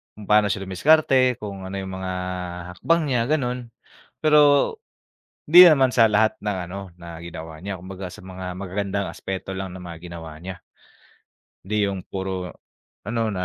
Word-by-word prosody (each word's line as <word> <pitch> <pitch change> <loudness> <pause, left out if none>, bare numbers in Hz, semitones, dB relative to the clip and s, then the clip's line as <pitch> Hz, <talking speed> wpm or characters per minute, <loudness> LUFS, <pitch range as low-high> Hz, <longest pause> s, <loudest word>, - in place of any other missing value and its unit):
kung 105 - -11
paano 105 0 +6
siya 100 -1 -2
dumiskarte, 130 - +3
kung 100 -2 -6
ano 95 - -6
yung 95 - -6
mga 95 0 -3 0.6
hakbang 165 - +2
niya, 125 -3 +2
ganun. 125 -5 -1 0.5
Pero 150 -1 +4 1.1
di 175 +4 +10
naman 135 -6 +5
sa 115 -2 +6
lahat 110 +1 +2
ng 105 -2 -2
ano, 100 - -5 0.2
na 85 -1 -10
ginawa 80 -2 -8
niya. 100 +1 -4
Kumbaga, 95 0 -7
sa 90 - -12
mga 90 -1 -6
magagandang 100 +1 -3
aspeto 95 0 -6
lang 95 -1 -5
ng 95 - -9
mga 85 -2 -8
ginawa 85 -2 -8
niya. 90 0 -8 1.0
Di 105 +1 +1
yung 95 -2 -5
puro 95 -2 -4 0.5
ano, 115 0 -1
na 90 -2 -2
95 Hz, 160 wpm, -23 LUFS, 90-115 Hz, 1.1 s, di